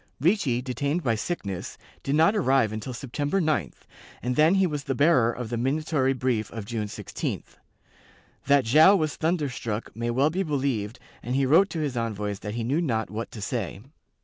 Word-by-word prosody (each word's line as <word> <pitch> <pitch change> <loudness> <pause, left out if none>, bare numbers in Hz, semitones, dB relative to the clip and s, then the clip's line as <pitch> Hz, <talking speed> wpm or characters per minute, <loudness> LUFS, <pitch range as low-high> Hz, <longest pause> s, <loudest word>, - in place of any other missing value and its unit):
Ricci, 145 - +1
detained 140 +6 -2
by 115 - +2
sickness, 105 - -4 0.2
did 135 - -1
not 165 +7 +4
arrive 135 - +2
until 110 +4 -5
September 145 +7 -2
9th, 145 - -1 0.4
and 125 +1 -1
then 155 +6 +5
he 195 -1 +4
was 150 -5 -3
the 135 - -1
bearer 135 -5 +4
of 120 -2 -6
the 120 - -1
minatory 135 +1 +1
brief 125 -5 0
of 110 -3 -7
June 110 -1 -3
16th. - - -5 0.9
That 140 -3 +4
Joao 155 - +7
was 155 -5 0
thunderstruck 140 -9 -2
may 120 +1 -2
well 135 +6 +2
be 185 +4 -1
believed 130 - -1 0.2
and 125 +2 -3
he 135 0 +2
wrote 170 +9 +5
to 165 - -3
his 145 -4 -2
envoys 105 -4 -3
that 105 +1 -5
he 120 - -2
knew 140 +8 0
not 115 -9 -1
what 110 +2 -4
to 110 - -9
say. 100 -3 -3
130 Hz, 185 wpm, -26 LUFS, 115-155 Hz, 0.9 s, Joao